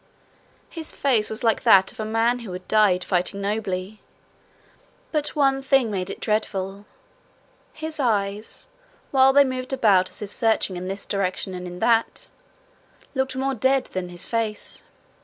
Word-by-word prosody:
His 325 -2 -5
face 240 -7 +2
was 220 +3 -5
like 225 -2 +2
that 190 0 +6
of - - -20
a 215 - -2
man 225 +3 +1
who 230 -6 -8
had 180 0 -8
died 205 -4 +3
fighting 180 +2 0
nobly; 200 -1 -3 1.1
but 300 -1 -2
one 270 -2 +3
thing 265 -4 +2
made 185 -2 -3
it - - -6
dreadful: 200 -2 -2 0.8
his 315 0 -5
eyes, 210 -4 -1 0.5
while 265 -1 +6
they 285 +1 +7
moved 255 0 -3
about 200 -8 +4
as - - -8
if 200 - -7
searching 220 -4 +1
in 180 +1 -5
this 195 +1 -5
direction 190 -1 -2
and 180 0 -6
in 180 0 -8
that, 230 -1 +1 0.8
looked 265 -1 -1
more 270 +1 0
dead 260 +2 +2
than 185 -1 -3
his 175 -1 -5
face. 225 -2 -3
215 Hz, 160 wpm, -24 LUFS, 195-260 Hz, 1.1 s, they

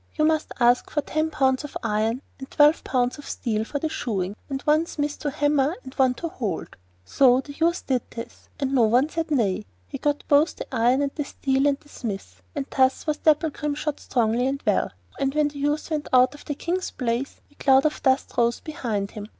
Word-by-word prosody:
You 305 - +2
must 315 -1 +1
ask 245 0 +3
for 295 - 0
ten 310 +2 -1
pounds 265 -3 +1
of 295 - -6
iron 225 +3 0 0.2
and 265 - -8
twelve 295 +2 +4
pounds 250 +1 0
of 290 - -9
steel 220 -3 -1
for 285 - -4
the 315 - -1
shoeing, 200 -10 -3
and 270 -1 -2
one 310 +2 +3
smith 290 -2 -3
to 295 - -2
hammer 290 +1 +1
and 260 - -10
one 260 -2 +3
to 335 - -4
hold.' 220 - -4 0.3
So 255 - +4
the 285 +2 -10
youth 335 +4 0
did 255 -3 +1
this, 230 0 -9
and 275 -1 -1
no 260 - +4
one 250 +7 +3
said 330 0 -3
him 295 - +2
nay. 195 - 0 0.2
He - - -6
got 290 0 0
both 295 +3 +4
the - - -6
iron 250 +3 +3
and 280 - -1
the 295 - -2
steel, 275 0 0
and 280 -1 +1
the 290 - -21
smiths, 195 - -6
and - - -2
thus 260 -1 +3
was 305 -1 0
Dapplegrim 300 -1 +1
shod 300 -1 -3
strongly 235 +1 +1
and 275 +1 -3
well, - - +2 0.3
and 275 +1 0
when 300 -1 +3
the 285 -1 -10
youth 295 +3 -1
went 305 -1 -2
out 255 +1 +5
of 290 - -13
the 290 - -3
King's 360 +5 -2
palace 250 +1 -3
a - - -25
cloud 270 0 +5
of 305 - 0
dust 265 0 +1
rose 235 0 +3
up - - -22
behind 220 -10 -3
him. 210 -1 -7
275 Hz, 225 wpm, -24 LUFS, 245-295 Hz, 0.3 s, out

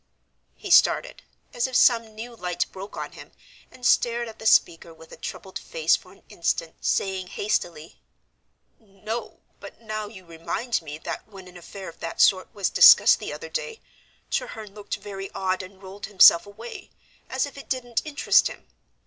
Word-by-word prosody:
He - - -7
started, - - +4 0.3
as 240 +1 0
if 260 - -7
some 230 -3 +4
new 235 +2 -8
light 180 -4 -2
broke 195 +2 -9
on - - -5
him, - - -13 0.4
and 250 - -11
stared 235 -1 +2
at 220 - -11
the 220 - -2
speaker 170 -4 +3
with 160 0 -16
a - - -9
troubled 190 0 -7
face 160 0 +1
for 185 - -11
an 195 - -21
instant, 165 -1 -3
saying 190 -1 -1
hastily, 175 -6 -3 0.8
"No, 215 +2 -7 0.2
but - - -12
now 215 -2 -5
you 195 -4 -13
remind 170 +8 -3
me 150 -2 -8
that - - -6
when 195 -3 -13
an 180 - -15
affair 190 +2 -10
of 165 - -11
that 165 - -6
sort 185 -1 +4
was 200 -4 -2
discussed - - +8
the - - -6
other 480 - -8
day 485 -2 -4 0.5
Treherne 215 -3 -4
looked 205 -1 -5
very 195 -1 -7
odd, 185 0 -1
and 190 +1 -13
rolled 195 +2 -8
himself 190 -3 +7
away, 225 +4 -10 0.4
as 260 +1 0
if 285 - -11
it 280 - -11
didn't 245 -3 -1
interest 300 -2 +3
him. - - -11
200 Hz, 175 wpm, -25 LUFS, 185-235 Hz, 0.8 s, discussed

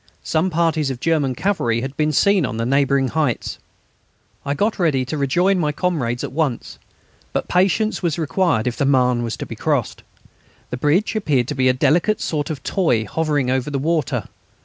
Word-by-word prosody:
Some 165 +4 0
parties 160 -3 +1
of 130 -2 -4
German 145 -4 0
cavalry 120 - 0
had 135 +2 -5
been 155 +1 +1
seen 200 +5 +3
on 125 -4 -3
the 115 - -1
neighbouring 135 0 +2
heights. 150 -6 -1 0.8
I 140 0 -2
got 210 +7 0
ready 145 -7 +1
to 125 - -4
rejoin 175 +7 +2
my 150 -3 +1
comrades 145 -8 -1
at - - -4
once. 140 -4 -2 0.5
But - - -2
patience 195 +4 +1
was 170 -5 -1
required 165 - +1
if 125 -1 -2
the 140 - +1
Marne 125 -3 +3
was 115 -1 -3
to - - -5
be - - -8
crossed. - - -1 0.7
The 125 - -3
bridge 155 - +1
appeared 145 - +1
to - - -1
be 130 -1 +3
a - - +4
delicate 175 +11 +2
sort 150 0 -2
of 155 -4 -5
toy 125 - +1
hovering 145 -4 0
over 130 +2 -1
the 140 - -2
water. 150 - -1
145 Hz, 190 wpm, -20 LUFS, 130-170 Hz, 0.8 s, a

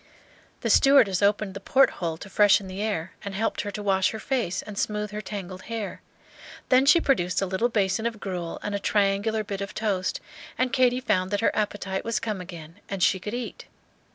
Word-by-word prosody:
The - - +1
stewardess 250 -10 +5
opened 205 -1 +2
the 195 - -6
port 265 +7 +4
hole 165 -2 -2
to 185 - -10
freshen 205 0 +4
the 190 +2 -5
air, 195 -5 -2
and 200 -1 -5
helped 225 +3 -1
her 205 - -4
to 205 +1 -6
wash 190 -2 +2
her 220 - -6
face 230 -8 -1
and 210 - -9
smooth 210 0 -2
her 210 0 -4
tangled 190 -3 -7
hair; 225 -3 -4 0.7
then 260 +1 +5
she 305 +4 +7
produced 185 - +1
a 195 - +1
little 190 +6 0
basin 205 0 +1
of 225 -2 -5
gruel 180 -4 -4
and 205 - -3
a 200 - -1
triangular 205 +2 +1
bit 200 -1 -5
of 200 0 -5
toast, 200 -4 -1 0.4
and 255 -1 0
Katy 255 0 +3
found 185 -7 +1
that 205 +1 -1
her - - +2
appetite 205 -2 -2
was 230 0 -1
come 210 -4 -3
again 170 -2 -10
and 195 -3 -2
she 190 - +3
could 210 +5 -5
eat. 245 -1 -6
205 Hz, 210 wpm, -26 LUFS, 190-220 Hz, 0.7 s, she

